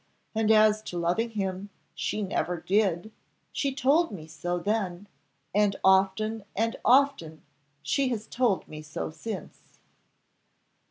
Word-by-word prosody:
And 220 -1 +1
as 215 -1 +5
to 175 - -5
loving 175 +7 0
him, 195 -2 -3 0.2
she 210 - -2
never 180 -2 -1
did; 195 +1 +1 0.4
she 275 - -1
told 290 +5 +3
me 170 -6 -8
so 170 +3 -3
then, 195 -1 -2 0.5
and 205 0 +3
often 195 +3 +3
and 230 +3 0
often 250 - +3 0.4
she 260 - +1
has 220 -3 -3
told 235 -6 0
me 155 0 -8
so 155 0 -5
since." 195 +1 -8
205 Hz, 125 wpm, -27 LUFS, 175-225 Hz, 0.5 s, as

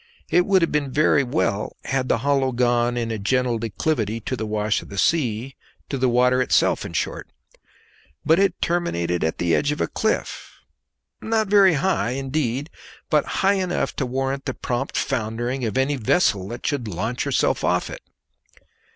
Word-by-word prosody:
It 180 +1 +3
would 190 -3 +4
have 165 - 0
been 145 -3 -1
very 145 0 +3
well 120 -6 -1
had 135 -1 -1
the - - +3
hollow 135 -2 +2
gone 120 0 +1
in 115 -1 -2
a 110 - -3
gentle 125 +2 0
declivity 115 0 -1
to 130 - -3
the 110 -3 -4
wash 105 0 0
of - - -13
the 100 - -8
sea, 130 -3 0 0.3
to 140 - -2
the 130 0 +2
water 125 +1 +3
itself, 125 - +2
in - - -7
short; - - -3 1.0
but 160 +3 +4
it 195 -3 +1
terminated 90 - -1
at 80 - -1
the 85 -1 0
edge 145 - +2
of 150 - -3
a - - +2
cliff, 220 - -2 0.7
not 220 -2 0
very 195 -3 +6
high 135 - 0
indeed, 135 +1 -2 0.4
but 150 -2 +3 0.2
high 195 +1 +5
enough 180 -1 -2
to 135 - -1
warrant 135 +2 -2
the 130 - -3
prompt 125 +3 -3
foundering 120 +3 -2
of 110 +3 -2
any 135 +2 +1
vessel 110 - +1
that 120 +3 -7
should 140 -6 -1
launch 110 +6 -3
herself - - +1
off 90 0 +1
it. - - -8
130 Hz, 175 wpm, -23 LUFS, 115-150 Hz, 1.0 s, very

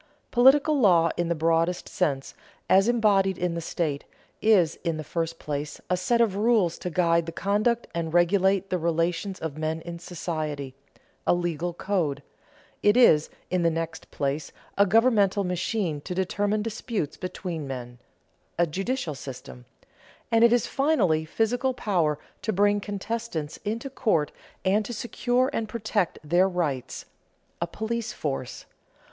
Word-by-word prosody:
Political 280 +4 +5
law 170 -7 +5
in 175 - -1
the 170 - +1
broadest 165 +2 +1
sense, 140 -7 -1 0.3
as 195 +3 +5
embodied 200 -5 +3
in 180 -1 -1
the 170 - -3
state, 155 -3 -2 0.4
is, 195 -8 +3
in 165 -3 -1
the 155 - -5
first 165 +1 -3
place, 145 -1 -4
a - - +4
set 235 +7 +1
of 215 -5 +2
rules 210 -5 +2
to 180 - -3
guide 170 -1 +2
the - - -3
conduct 210 +7 0
and 165 -1 -2
regulate 190 +2 +3
the 180 - +1
relations 170 +4 -1
of 155 -2 -5
men 160 +1 -1
in 170 0 -7
society 155 -5 -4 0.5
a - - +5
legal 175 0 -2
code; 175 -5 -1 0.6
it 205 +3 +4
is, 160 -11 +6 0.2
in 185 -1 +1
the 170 - +3
next 165 0 -4
place, 140 +2 -2 0.2
a 200 0 +4
governmental 210 -2 +3
machine 180 -3 -1
to 180 - -5
determine 205 +3 0
disputes 220 - -3
between 180 -4 -5
men 125 -2 -7 0.6
a 175 - +4
judicial 195 - -2
system; 130 -2 -9 0.7
and 230 0 +5
it 235 - +7
is, 245 -1 +3
finally, 210 - +2
physical 245 +8 0
power 170 -11 +1 0.2
to 220 - -1
bring 205 +1 +3
contestants 205 -6 -4
into 225 +5 -4
court 215 - 0 0.3
and 200 +3 +3
to 240 - -6
secure 245 +3 0
and 220 -1 -2
protect 215 -4 -1
their 175 +5 +3
rights 155 -8 -3 0.6
a 170 - 0
police 225 +5 -3
force. 135 -4 -4
180 Hz, 150 wpm, -26 LUFS, 160-215 Hz, 0.7 s, it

